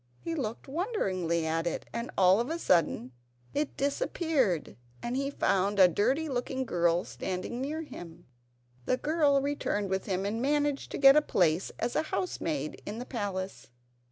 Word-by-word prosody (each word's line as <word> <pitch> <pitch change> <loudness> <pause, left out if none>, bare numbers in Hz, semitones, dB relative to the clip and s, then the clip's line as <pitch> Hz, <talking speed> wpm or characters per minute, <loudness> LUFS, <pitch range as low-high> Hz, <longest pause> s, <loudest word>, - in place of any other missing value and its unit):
He 335 - -4
looked 245 -8 -4
wonderingly 190 - -1
at 165 +1 0
it, 170 - -3
and 235 +1 -3
all 190 +1 +6
of 240 - -1
a 330 - -1
sudden 165 - +2 0.4
it 295 0 -2
disappeared 280 - 0 0.2
and 240 +1 -3
he 275 +1 0
found 200 -7 +1
a 185 -2 +8
dirty 255 - +1
looking 260 0 -2
girl 175 -3 +2
standing 190 +6 -4
near 310 +4 -3
him. 170 - -10 0.6
The 255 - +2
girl 295 -2 +2
returned 210 -8 -1
with 190 0 -1
him 190 -1 -1
and 220 +3 -2
managed 290 +1 0
to - - -2
get 275 0 +8
a 300 - +6
place 175 - +1
as 235 +1 -2
housemaid 160 - -2
in 210 - -6
the 245 - -5
palace. 195 -6 -4
235 Hz, 160 wpm, -30 LUFS, 185-285 Hz, 0.6 s, a